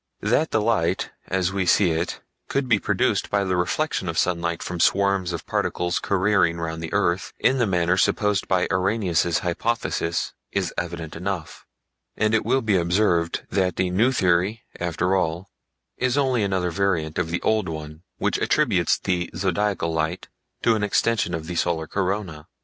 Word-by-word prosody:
That 125 Hz, +9 st, +2 dB
the -, -, +1 dB
Light 95 Hz, -5 st, 0 dB, 0.2 s
as 95 Hz, 0 st, 0 dB
we 95 Hz, -2 st, -1 dB
see 90 Hz, 0 st, +4 dB
it 80 Hz, +2 st, -2 dB, 0.3 s
could 140 Hz, -1 st, -1 dB
be 110 Hz, -4 st, +3 dB
produced -, -, 0 dB
by 100 Hz, -1 st, +1 dB
the 95 Hz, -1 st, 0 dB
reflection 90 Hz, -, -1 dB
of 80 Hz, -, -4 dB
sunlight 85 Hz, -1 st, 0 dB
from 90 Hz, -1 st, -5 dB
swarms 100 Hz, -1 st, +2 dB
of 85 Hz, -, -5 dB
particles 90 Hz, 0 st, -1 dB
careering 95 Hz, -3 st, +2 dB
round 80 Hz, -1 st, -4 dB
the 80 Hz, -, -5 dB
earth 95 Hz, -3 st, 0 dB
in 130 Hz, +1 st, +2 dB
the 120 Hz, -, +2 dB
manner 90 Hz, -1 st, +2 dB
supposed 105 Hz, +1 st, +1 dB
by 95 Hz, -2 st, +2 dB
Arrhenius' 90 Hz, -3 st, +1 dB
hypothesis 90 Hz, -2 st, -1 dB, 0.2 s
is -, -, -1 dB
evident 85 Hz, -2 st, -5 dB
enough; 90 Hz, -2 st, -5 dB, 0.5 s
and 110 Hz, +1 st, +1 dB
it 110 Hz, -, +3 dB
will 135 Hz, -1 st, +1 dB
be 105 Hz, -4 st, +2 dB
observed 85 Hz, -1 st, +1 dB
that 95 Hz, -2 st, +1 dB
the 90 Hz, -1 st, 0 dB
new 110 Hz, +8 st, +3 dB
theory, 95 Hz, 0 st, +1 dB, 0.2 s
after 90 Hz, +2 st, 0 dB
all, 90 Hz, +1 st, -1 dB, 0.5 s
is 130 Hz, +1 st, 0 dB
only 130 Hz, -4 st, +2 dB
another 95 Hz, -3 st, 0 dB
variant 85 Hz, -5 st, 0 dB
of 85 Hz, -2 st, -1 dB
the 85 Hz, -, -1 dB
older 110 Hz, -4 st, +1 dB
one 75 Hz, 0 st, -7 dB, 0.2 s
which -, -, 0 dB
attributes -, -, +2 dB
the 90 Hz, -1 st, -1 dB
Zodiacal 95 Hz, -1 st, 0 dB
Light 80 Hz, +3 st, -2 dB, 0.3 s
to 115 Hz, -, +4 dB
an 110 Hz, -, 0 dB
extension 105 Hz, -2 st, +1 dB
of 80 Hz, -1 st, -5 dB
the 90 Hz, -, -5 dB
solar 85 Hz, -1 st, 0 dB
corona. 95 Hz, -4 st, -3 dB
90 Hz, 170 wpm, -24 LUFS, 85-105 Hz, 0.5 s, see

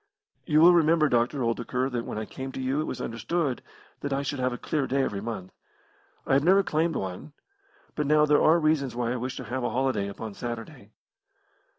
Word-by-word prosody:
"You 155 Hz, -2 st, +4 dB
will 175 Hz, +2 st, +8 dB
remember, 160 Hz, -2 st, +4 dB
Dr. 120 Hz, +3 st, +1 dB
Oldacre, 120 Hz, +2 st, -1 dB
that 120 Hz, -1 st, -3 dB
when -, -, -5 dB
I 110 Hz, -, -3 dB
came 130 Hz, +4 st, -7 dB
to -, -, -6 dB
you 130 Hz, +3 st, 0 dB
it -, -, -2 dB
was 130 Hz, -, -5 dB
understood 130 Hz, +4 st, -2 dB, 0.4 s
that 145 Hz, -, -4 dB
I 140 Hz, +1 st, 0 dB
should 140 Hz, 0 st, -3 dB
have 130 Hz, 0 st, +1 dB
a 125 Hz, -, -4 dB
clear 145 Hz, 0 st, -2 dB
day 135 Hz, +1 st, +1 dB
every 100 Hz, -6 st, -2 dB
month. 105 Hz, -5 st, -6 dB, 0.7 s
I -, -, +1 dB
have 140 Hz, +1 st, +4 dB
never 190 Hz, +4 st, +5 dB
claimed 165 Hz, -2 st, 0 dB
one. 95 Hz, +10 st, -5 dB, 0.6 s
But 150 Hz, -2 st, -2 dB
now 150 Hz, 0 st, +5 dB
there 150 Hz, 0 st, +4 dB
are 160 Hz, +2 st, +5 dB
reasons 155 Hz, -5 st, +1 dB
why 120 Hz, -1 st, -1 dB
I 125 Hz, -, -1 dB
wish 125 Hz, +1 st, -4 dB
to -, -, -5 dB
have 130 Hz, 0 st, -4 dB
a -, -, 0 dB
holiday 125 Hz, -4 st, 0 dB
upon 105 Hz, +2 st, -7 dB
Saturday." 120 Hz, 0 st, -7 dB
130 Hz, 215 wpm, -27 LUFS, 120-150 Hz, 0.7 s, will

